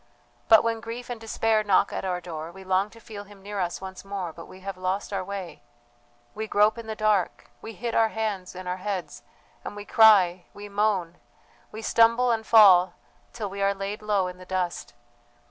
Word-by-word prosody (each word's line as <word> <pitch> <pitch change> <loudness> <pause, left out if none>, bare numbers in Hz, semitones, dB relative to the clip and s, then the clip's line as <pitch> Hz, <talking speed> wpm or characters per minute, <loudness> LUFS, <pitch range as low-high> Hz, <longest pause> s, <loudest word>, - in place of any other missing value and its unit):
But 220 - +8
when 230 -1 -1
grief 230 +2 -7
and 235 -2 -6
despair 225 -1 +1
knock 200 -3 +2
at - - -3
our 180 -2 -2
door, 165 -2 -7
we 190 +2 -12
long 190 +2 +1
to 230 - -16
feel 215 -2 -9
Him 200 -1 -16
near 205 0 -5
us 175 -1 -2
once 190 -1 -8
more, 195 -4 -5
but 165 - -11
we 185 - -14
have 195 0 -5
lost 185 +2 -3
our 195 -1 -1
way. 195 -2 -7 0.7
We 220 +1 -5
grope 210 +2 +3
in 230 - -9
the 220 - -4
dark, 215 -4 0
we 225 - -8
hit 230 +3 -4
our 225 - +4
hands 210 -5 -4
and 185 0 -8
our 180 +1 -2
heads, 190 -1 -5 0.4
we 205 0 -7
cry, 220 -5 +7
and 175 +1 -10
we 205 0 -9
moan, 200 -4 0 0.5
we 220 +1 -8
stumble 230 +2 +4
and 225 -1 0
fall 185 -5 +7 0.4
till 210 -4 -5
we 200 0 -5
are 200 0 +2
laid 195 +2 -5
low 205 -3 +1
in 180 0 -7
the - - -10
dust. 180 -6 -3
200 Hz, 205 wpm, -26 LUFS, 185-220 Hz, 0.7 s, But